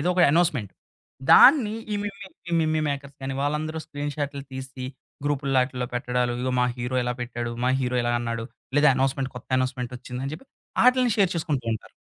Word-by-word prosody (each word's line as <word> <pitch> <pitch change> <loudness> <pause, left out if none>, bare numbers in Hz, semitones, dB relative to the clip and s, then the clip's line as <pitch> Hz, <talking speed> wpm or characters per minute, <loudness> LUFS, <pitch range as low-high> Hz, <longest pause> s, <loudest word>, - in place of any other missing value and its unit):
ఏదో 175 - 0
ఒక 180 - +4
అనోన్స్‌మెంట్, 150 - +2 0.6
దాన్ని 250 -7 +8 0.2
ఈ - - +1
మిమ్మి 200 -1 -6 0.2
ఈ - - -4
మిమ్మీ 155 0 +1
మేకర్స్ 140 -1 -5
గాని, 135 0 -3
వాళ్ళందరూ 155 +2 -1
స్క్రీన్‌ 145 -1 -4
షాటులు 140 -2 -3
తీసి 130 -1 -7 0.4
గ్రూప్‌లో 140 -2 +1
అటిల్లో 125 -1 -3
పెట్టడాలు, 125 0 0
"ఇగో 130 0 -1
మా - - +4
హీరో 125 +1 -2
ఇలా 125 0 -1
పెట్టాడు, 120 -1 -3
మా - - +3
హీరో 125 -1 0
ఇలా 120 0 0
అన్నాడు 115 -1 -3 0.3
లేదా 145 +1 +6
అనోన్స్‌మెంట్ 135 +1 0
కొత్త - - -10
అనోన్స్‌మెంట్ 130 -1 -2
ఒచ్చింది" 125 0 -7
అని 140 - -4
జెప్పి, 270 - -12 0.4
అటిల్ని 250 -2 +4
షేర్ 195 -4 +3
చేసుకుంటూ 155 -6 -1
ఉంటారు. 110 - -6
135 Hz, 185 wpm, -25 LUFS, 125-155 Hz, 0.6 s, దాన్ని